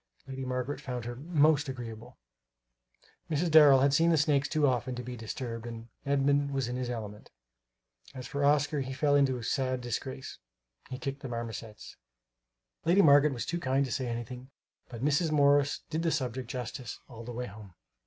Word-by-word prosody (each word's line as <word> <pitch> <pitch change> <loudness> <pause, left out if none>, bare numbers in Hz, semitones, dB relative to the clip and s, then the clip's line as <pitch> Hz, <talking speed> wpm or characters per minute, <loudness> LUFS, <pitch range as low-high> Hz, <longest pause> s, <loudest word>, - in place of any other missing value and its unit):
Lady 135 0 -6
Margaret 130 +2 -3
found 125 -4 -5
her 120 0 -5
"most 150 0 +2
agreeable." 115 -4 -8 1.1
Mrs. 165 +2 0
Darrel 145 -4 +8
had 140 0 +3
seen 165 +4 +4
the 165 - +4
snakes 145 -2 +2
too 155 -1 +2
often 125 -1 0
to 125 - -5
be 125 0 -6
disturbed, 115 0 -6
and 115 0 -8 0.2
Edmund 140 0 +2
was 135 -3 0
in 125 - -3
his 125 -1 -3
element. 105 -3 -6 0.9
As 130 -1 -7
for 140 +1 -3
Oscar, 145 +1 +3
he 135 0 -4
fell 145 +1 +1
into 135 -3 +3
sad 130 +1 0
disgrace 130 +2 -5 0.5
he 130 - -5
kicked 135 +2 -4
the 135 - -6
marmosets. 115 -2 -7 0.9
Lady 180 +5 +4
Margaret 145 0 +6
was 120 -3 -4
too 170 - -2
kind 135 -2 +1
to 130 - -6
say 130 +1 -2
anything; 120 +2 -6 0.4
but 120 +1 -5
Mrs. 150 +3 +2
Morris 145 -1 +3
did 160 +1 -1
the 165 - +1
subject 130 -5 -2
justice 125 -1 -5
all 115 -2 -10
the 120 - -7
way 125 +1 -4
home. 100 -4 -12
130 Hz, 180 wpm, -30 LUFS, 120-145 Hz, 1.1 s, Darrel